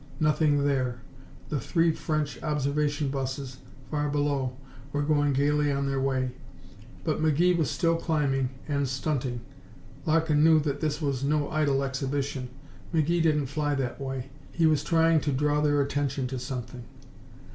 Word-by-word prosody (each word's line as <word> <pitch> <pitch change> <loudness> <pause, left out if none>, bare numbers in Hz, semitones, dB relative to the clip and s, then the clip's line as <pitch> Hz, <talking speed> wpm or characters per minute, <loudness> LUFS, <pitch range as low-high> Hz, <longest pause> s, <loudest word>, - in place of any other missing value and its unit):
Nothing 150 -2 +3
there. 130 -4 0 0.5
The 150 - -1
three 165 +6 +2
French 155 -2 -2
observation 145 -1 0
busses, 135 -1 -4 0.3
far 150 -1 0
below, 140 -3 0 0.3
were 145 +1 0
going 145 -1 +2
gaily 145 +2 +2
on 140 0 0
their 135 0 0
way. 130 -1 0 0.7
But 155 -2 -1
McGee 160 +4 +3
was 160 -6 +1
still 165 -2 +1
climbing 140 -6 0 0.2
and 140 -2 0
stunting. 130 -3 -2 0.7
Larkin 155 -1 +3
knew 160 -1 +6
that 145 -1 -2
this 155 0 -1
was 140 -2 -1
no 145 0 +1
idle 145 -3 +1
exhibition. 135 -1 -2 0.4
McGee 165 +1 +2
didn't 150 -3 +2
fly 145 +2 -1
that 130 -1 -3
way. 135 -1 -4 0.2
He 165 - +1
was 155 -2 +3
trying 165 -1 +3
to 145 - -1
draw 145 +2 +1
their 145 -1 +3
attention 140 -1 -1
to 130 -1 -4
something. 125 -1 -6
145 Hz, 150 wpm, -27 LUFS, 135-155 Hz, 0.7 s, knew